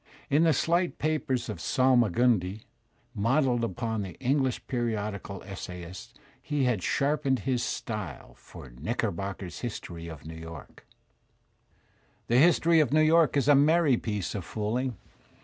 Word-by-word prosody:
In 155 +4 +4
the 165 - +5
slight 170 +5 +1
papers 150 -5 -1
of 105 -7 -5
Salmagundiy 120 -5 +2 0.5
modelled 120 +2 +1
upon 110 +1 -2
the 95 -3 -6
English 130 -1 0
periodical 105 -5 -3
essay 90 -3 -7
ists, 90 +2 -10 0.3
he 145 -2 -1
had 125 -6 +1
sharpened 140 - +1
his 125 +2 0
style 105 - -5
for - - -13
*'£jiickerbooker's 95 +8 -4
History 85 -8 -6
of 80 -3 -10
New 80 - -7
York/' 80 -2 -11 1.4
The 120 +2 +5
"History 165 +1 +5
of 150 -5 +2
New 155 - +4
York*' 155 -2 +4
is 140 - +1
a 145 - +7
merry 150 0 +4
piece 105 -5 -3
of 100 - -4
fooling. 115 +5 -2
120 Hz, 135 wpm, -28 LUFS, 100-140 Hz, 1.4 s, a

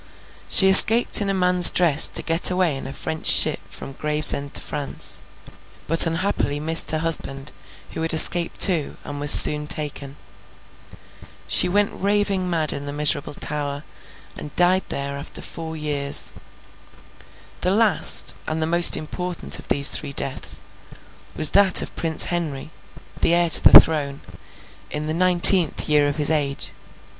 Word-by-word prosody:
She 190 - +6
escaped 220 +4 +5
in 200 - -4
a - - -3
man's 180 -1 +4
dress 165 -5 0
to - - -5
get 165 +1 +2
away 180 -5 -2
in 135 - -9
a - - -9
French 160 +3 -8
ship - - +3
from - - -12
Gravesend 150 -1 -1
to - - -1
France, 145 -2 -3 0.6
but 165 +2 +2
unhappily 165 -4 -4
missed 160 +2 +2
her 155 - -2
husband, 150 -3 0 0.4
who - - -9
had 165 - -3
escaped 170 +1 +2
too, 170 -7 -1
and 145 0 -10
was 145 0 -3
soon 150 0 +6
taken. 145 -2 -6 1.3
She - - +3
went 205 +2 -2
raving 200 -2 -3
mad 160 -3 +1
in 140 0 -8
the - - -7
miserable 145 0 -1
Tower, 145 -1 -7 0.5
and 150 - -12
died 180 +2 0
there 140 0 -6
after 140 - -7
four 160 -1 -10
years. 145 -2 -4 1.3
The 180 - -3
last, 215 +1 0
and 155 0 -5
the 160 - -3
most 170 +1 +5
important 180 +3 -3
of - - -14
these 140 0 +4
three 145 -2 -7
deaths, 135 -1 -2 0.7
was 155 -2 0
that 200 -2 +3
of - - -13
Prince 160 -2 -3
Henry, 160 -4 -6 0.5
the 170 - +2
heir 170 -1 -1
to - - +3
the - - +8
throne, 145 -3 -4 0.7
in 150 +1 -7
the 155 - -5
nineteenth 180 -1 +4
year 150 -1 0
of 145 - -5
his 150 0 -2
age. 140 -3 -4
160 Hz, 155 wpm, -19 LUFS, 145-180 Hz, 1.3 s, the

